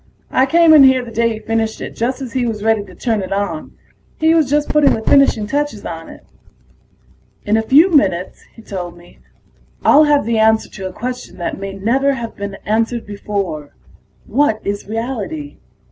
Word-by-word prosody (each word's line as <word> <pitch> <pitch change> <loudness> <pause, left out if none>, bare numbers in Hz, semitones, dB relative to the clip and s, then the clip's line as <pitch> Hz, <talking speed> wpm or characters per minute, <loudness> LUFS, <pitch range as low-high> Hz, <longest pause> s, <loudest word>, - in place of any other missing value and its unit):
I 260 +1 +3
came 330 +2 +5
in 300 -3 +8
here 260 -2 +4
the 230 - -10
day 230 +1 +1
he - - -6
finished 225 0 -2
it, - - -6
just 255 +4 -2
as 245 - -8
he 255 -2 0
was 215 -2 -4
ready 220 -2 +2
to 185 -2 -15
turn 225 0 -1
it 185 - -6
on. 195 -6 -3 0.5
He 320 +1 +4
was 315 -5 +2
just 295 +1 +1
putting 300 -2 +3
the 220 - -6
finishing 275 -6 +3
touches 285 -2 -3
on 165 -1 -7
it. - - -14 1.2
"In 210 - +2
a 220 - +2
few 295 +11 +5
minutes," 190 - +1
he 225 - -14
told 175 -4 -6
me, 175 0 -18 0.7
"I'll 305 +2 +6
have 290 -4 +2
the 230 -1 0
answer 220 0 +3
to 190 -2 -7
a - - -7
question 250 +4 -6
that 175 - -4
may 195 0 -6
never 255 +8 +1
have 235 -3 -6
been 200 -1 -6
answered 225 +2 -1
before: 200 -7 -5 0.5
what 260 -6 +1
is 200 0 -3
reality? 255 +7 -5
225 Hz, 190 wpm, -17 LUFS, 200-270 Hz, 1.2 s, in